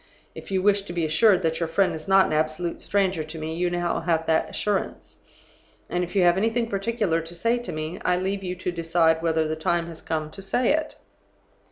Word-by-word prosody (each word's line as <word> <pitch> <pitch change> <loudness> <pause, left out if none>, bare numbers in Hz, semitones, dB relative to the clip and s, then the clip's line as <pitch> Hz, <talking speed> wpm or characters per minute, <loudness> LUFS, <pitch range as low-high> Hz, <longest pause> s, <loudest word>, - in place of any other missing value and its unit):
If - - -10
you 190 -1 0
wish 200 0 +4
to 195 -3 -8
be 170 -2 0
assured 180 +5 +4
that 160 0 0
your 165 -2 -1
friend 190 +4 +2
is 155 -1 -7
not 195 0 +6
an - - -2
absolute 155 +3 -1
stranger 190 -5 0
to 155 +2 -9
me, 160 0 -4
you 175 +2 0
now 175 -1 -1
have 165 -1 0
that 160 0 +1
assurance; 205 -2 -3 0.7
and 180 0 0
if 180 +3 -7
you 190 - +4
have 175 0 +4
anything 225 +3 +1
particular 195 -4 0
to 165 +2 -9
say 230 +7 +1
to 240 - -6
me, 155 +4 -5
I 180 - +2
leave 195 +2 -2
you 180 -1 -3
to 180 0 -3
decide 165 -1 +2
whether 160 -1 +1
the 155 - -2
time 170 +2 0
has 165 -1 -10
come 155 -1 -3
to 195 - -8
say 230 +7 +2
it. 315 0 -2
175 Hz, 225 wpm, -25 LUFS, 160-195 Hz, 0.7 s, not